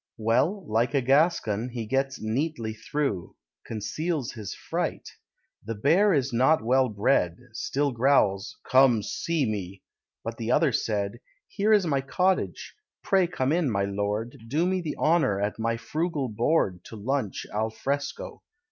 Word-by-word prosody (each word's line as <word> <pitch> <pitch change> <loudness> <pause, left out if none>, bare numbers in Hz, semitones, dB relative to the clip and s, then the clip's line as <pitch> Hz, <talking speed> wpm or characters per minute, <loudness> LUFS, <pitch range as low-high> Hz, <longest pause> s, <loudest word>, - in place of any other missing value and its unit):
Well, 145 - +1
like 115 +5 +1
a 140 - +3
Gascon, 130 - +2
he 120 -2 -5
gets 135 +3 -1
neatly 115 0 -2
through: 110 - -3 0.3
Conceals 130 - -3
his 110 -5 -7
fright. - - -3 0.6
The 115 +2 -4
bear 170 - +4
is 140 -6 +1
not 130 +4 +3
well 130 +2 +3
bred; 100 -4 +1 0.2
Still 140 +5 -1
growls, 115 -5 +2
"Come, 130 -5 +5
see 165 +3 -1
me!" 100 -3 -4 0.4
but 115 0 -5
the 115 +1 -2
other 150 +2 +4
said, 105 -1 -1 0.3
"Here 210 +1 0
is 205 -4 +5
my 140 -4 +1
cottage; 180 +7 0 0.3
pray 190 -2 +3
come 135 -6 -1
in, 165 -3 +2
my 100 -3 0
lord; 105 +4 -3
Do 155 +8 +1
me 185 0 0
the 155 -3 -4
honour 155 - +2
at 105 +2 -2
my 115 +1 0
frugal 150 +3 -2
board 110 - +1
To - - -10
lunch 110 0 -2
al 110 +1 0
fresco. 140 +7 -4
125 Hz, 150 wpm, -26 LUFS, 110-150 Hz, 0.6 s, Come